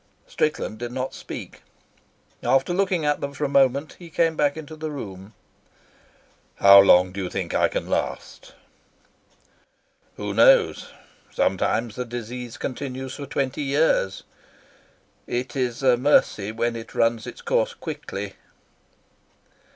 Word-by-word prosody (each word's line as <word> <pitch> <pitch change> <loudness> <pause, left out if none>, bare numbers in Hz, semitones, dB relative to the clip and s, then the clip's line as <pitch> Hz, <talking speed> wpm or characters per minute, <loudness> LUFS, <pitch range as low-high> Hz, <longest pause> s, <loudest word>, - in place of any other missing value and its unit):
Strickland 150 -8 -2
did 120 0 -5
not 130 +1 -4
speak. - - -9 0.8
After 135 +6 +2
looking 185 -4 0
at 145 0 +1
them 140 0 -4
for 150 - -5
a - - +1
moment, 140 +1 +2
he 175 -2 -11
came 165 0 +1
back 145 0 +1
into 155 0 -8
the 155 0 -5
room. 100 -8 -8 1.2
"How 100 0 +8
long 90 -2 +6
do 100 +1 -5
you 90 - -3
think - - -4
I - - +3
can - - -4
last?" - - -4 1.6
"Who - - -4
knows? - - +4 0.4
Sometimes 115 -2 0
the 125 - -3
disease 120 0 -7
continues 130 -1 -5
for 140 - -7
twenty 140 0 -2
years. 140 - +1 1.0
It 120 0 -3
is 125 -1 -2
a 125 -2 +5
mercy 120 -6 +2
when 115 +1 -1
it 115 0 -9
runs 115 0 +1
its - - -9
course - - 0
quickly." - - -6
130 Hz, 135 wpm, -24 LUFS, 115-150 Hz, 1.6 s, How